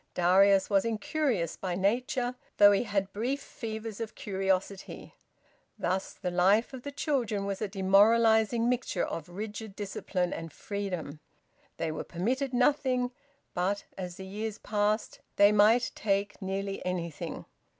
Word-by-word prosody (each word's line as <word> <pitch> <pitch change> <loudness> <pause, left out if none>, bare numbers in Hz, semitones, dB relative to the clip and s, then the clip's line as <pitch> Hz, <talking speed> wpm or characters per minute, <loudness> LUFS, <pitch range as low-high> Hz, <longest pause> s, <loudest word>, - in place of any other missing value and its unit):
Darius 190 +2 +5
was 195 -2 +3
incurious 230 - -1
by 185 -2 -3
nature, 245 +5 0 0.2
though 205 0 +8
he 200 +4 +2
had 195 -3 -1
brief 250 +7 -1
fevers 220 -5 -6
of 225 - -5
curiosity. 190 -1 -2 0.6
Thus 185 +2 -1
the 180 -3 -4
life 195 +8 +3
of 260 - -7
the 285 - -6
children 240 -9 -1
was 195 -1 -3
a 215 - 0
demoralising 220 +4 +4
mixture 245 -7 0
of 165 0 -6
rigid 210 +2 -6
discipline 190 -3 -2
and 165 -1 -6
freedom. 180 -6 -5 0.6
They 165 -1 -1
were 155 - -4
permitted 250 +10 -1
nothing, 250 -1 +2 0.4
but, 195 +3 0
as 180 -2 -6
the 190 - -8
years 210 +2 -4
passed, 210 +1 -1 0.2
they 205 0 +6
might 215 +4 +4
take 200 0 -1
nearly 195 +1 -3
anything. 170 -3 -4
205 Hz, 140 wpm, -29 LUFS, 190-230 Hz, 0.6 s, though